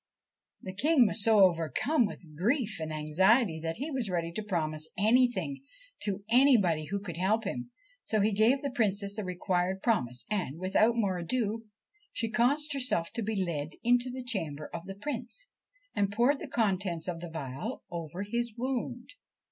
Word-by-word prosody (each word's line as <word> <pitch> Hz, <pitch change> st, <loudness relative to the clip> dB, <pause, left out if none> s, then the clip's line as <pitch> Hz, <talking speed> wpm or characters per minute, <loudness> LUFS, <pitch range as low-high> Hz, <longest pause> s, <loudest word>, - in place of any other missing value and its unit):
The 185 Hz, -, -6 dB
King 275 Hz, +5 st, +4 dB
was 210 Hz, 0 st, +3 dB
so 220 Hz, -2 st, +5 dB
overcome 185 Hz, -, +3 dB
with 165 Hz, -6 st, -10 dB
grief 225 Hz, -, 0 dB
and 160 Hz, -1 st, -4 dB
anxiety 160 Hz, +5 st, +2 dB
that 165 Hz, 0 st, -3 dB
he 290 Hz, +6 st, -4 dB
was 255 Hz, -7 st, -2 dB
ready 170 Hz, -2 st, -1 dB
to 195 Hz, -, -3 dB
promise 155 Hz, -6 st, -2 dB
anything 215 Hz, -, +2 dB, 0.4 s
to 200 Hz, -1 st, -2 dB
anybody 225 Hz, -, +4 dB
who 200 Hz, +6 st, -3 dB
could 180 Hz, -5 st, -7 dB
help 210 Hz, +5 st, +1 dB
him, 240 Hz, +4 st, -4 dB, 0.3 s
so 215 Hz, -, 0 dB
he 210 Hz, +2 st, +3 dB
gave 225 Hz, +7 st, +3 dB
the 280 Hz, -, -2 dB
Princess 200 Hz, -4 st, 0 dB
the 215 Hz, -, -3 dB
required 185 Hz, +1 st, -1 dB
promise, 125 Hz, -, +1 dB
and, 180 Hz, -8 st, -1 dB
without 195 Hz, +6 st, +2 dB
more 195 Hz, -5 st, 0 dB
ado, 225 Hz, +4 st, -2 dB, 0.5 s
she 225 Hz, -1 st, -2 dB
caused 285 Hz, +7 st, +2 dB
herself 250 Hz, -11 st, 0 dB
to 230 Hz, -, -2 dB
be 205 Hz, -3 st, -1 dB
led 155 Hz, -2 st, -3 dB
into 245 Hz, +1 st, +3 dB
the 255 Hz, 0 st, -5 dB
chamber 160 Hz, -, -3 dB
of 170 Hz, +1 st, -6 dB
the 195 Hz, -, -6 dB
Prince, 265 Hz, -, -4 dB, 0.5 s
and 200 Hz, -1 st, +1 dB
poured 245 Hz, +7 st, +2 dB
the 320 Hz, -, -6 dB
contents 190 Hz, -, -1 dB
of 175 Hz, -2 st, -3 dB
the 175 Hz, 0 st, -7 dB
phial 155 Hz, -, -5 dB
over 170 Hz, +2 st, -5 dB
his 235 Hz, +1 st, -2 dB
wound. 250 Hz, 0 st, -3 dB
205 Hz, 170 wpm, -30 LUFS, 170-240 Hz, 0.5 s, so